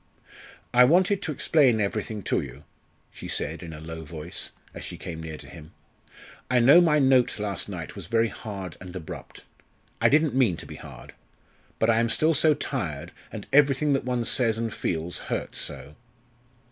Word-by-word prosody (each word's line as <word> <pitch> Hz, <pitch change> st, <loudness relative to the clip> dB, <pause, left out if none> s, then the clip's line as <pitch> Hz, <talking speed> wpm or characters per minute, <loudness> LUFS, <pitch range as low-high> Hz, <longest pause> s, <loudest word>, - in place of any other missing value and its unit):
"I 125 Hz, +1 st, +8 dB
wanted 185 Hz, -, +4 dB
to 160 Hz, -, -3 dB
explain 135 Hz, -5 st, +3 dB
everything 105 Hz, 0 st, -2 dB
to -, -, +1 dB
you," -, -, -10 dB, 0.5 s
she -, -, -9 dB
said -, -, -2 dB
in 85 Hz, -, -8 dB
a 75 Hz, -, -8 dB
low 80 Hz, +1 st, -7 dB
voice, 80 Hz, +2 st, -7 dB, 0.2 s
as -, -, -8 dB
she -, -, -7 dB
came 80 Hz, -2 st, -7 dB
near 80 Hz, -1 st, -6 dB
to 70 Hz, -, -12 dB
him. 75 Hz, +3 st, -12 dB, 0.8 s
"I 125 Hz, -1 st, +4 dB
know 140 Hz, +9 st, +8 dB
my 160 Hz, -3 st, +4 dB
note 130 Hz, -3 st, +4 dB
last 105 Hz, -1 st, -3 dB
night 85 Hz, -5 st, -6 dB
was 100 Hz, -5 st, -8 dB
very 115 Hz, +2 st, +2 dB
hard 100 Hz, -6 st, -7 dB
and 90 Hz, 0 st, -9 dB
abrupt. 80 Hz, -4 st, -8 dB, 0.6 s
I -, -, +5 dB
didn't 155 Hz, 0 st, +3 dB
mean 120 Hz, -10 st, +3 dB
to -, -, -8 dB
be -, -, -9 dB
hard. -, -, -11 dB, 0.6 s
But 110 Hz, +1 st, +3 dB
I 115 Hz, -, +3 dB
am 115 Hz, 0 st, +1 dB
still 155 Hz, +7 st, +2 dB
so 155 Hz, +1 st, +4 dB
tired 85 Hz, -, -4 dB, 0.2 s
and 110 Hz, -3 st, -7 dB
everything 145 Hz, +1 st, +4 dB
that 135 Hz, -, 0 dB
one 125 Hz, -2 st, -1 dB
says, 115 Hz, -3 st, +2 dB
and 115 Hz, -2 st, -2 dB
feels, 85 Hz, +1 st, -2 dB
hurts -, -, -3 dB
so." 70 Hz, -, -5 dB
110 Hz, 185 wpm, -26 LUFS, 85-135 Hz, 0.8 s, I